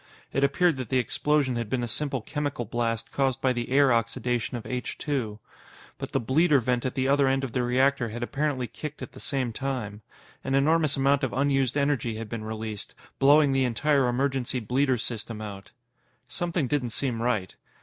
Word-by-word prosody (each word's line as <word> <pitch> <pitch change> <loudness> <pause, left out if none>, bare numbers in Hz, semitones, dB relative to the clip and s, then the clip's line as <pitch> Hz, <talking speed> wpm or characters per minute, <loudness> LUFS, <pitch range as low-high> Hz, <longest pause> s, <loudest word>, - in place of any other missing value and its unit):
It 135 - +1
appeared 155 +3 +3
that 130 -4 -5
the 130 - +2
explosion 130 +1 +1
had 115 -3 -3
been 125 0 0
a - - -1
simple 135 +2 -2
chemical 145 -1 -3
blast 115 0 -2
caused 135 -2 +1
by 130 -1 +2
the 120 -1 -3
air 135 -1 +5
oxidation 120 +1 -1
of 115 - -8
H 125 -1 -4
2. 125 -8 -2 0.6
But - - -5
the - - +1
bleeder 145 +6 +3
vent 125 0 0
at 130 - -5
the 130 -1 +1
other 140 0 +4
end 135 0 +1
of 130 - -3
the 125 - 0
reactor 125 0 +2
had 120 +2 -5
apparently 135 0 -1
kicked 150 +6 -7
at - - -8
the - - -12
same 130 -5 -2
time. 120 -6 -4 0.4
An 135 - 0
enormous 155 +1 +3
amount 135 +1 +3
of 130 - -1
unused 135 -1 +1
energy 140 -5 +1
had 110 -1 -6
been 115 -1 -4
released, 110 -1 -6 0.2
blowing 145 +1 +6
the 135 0 +2
entire 135 +2 +2
emergency 130 0 0
bleeder 125 +3 +1
system 115 -1 -5
out. 100 -2 -7 0.6
Something 170 -3 -1
didn't 130 -2 0
seem 115 0 -2
right. 110 -7 -1
130 Hz, 190 wpm, -27 LUFS, 120-140 Hz, 0.6 s, blowing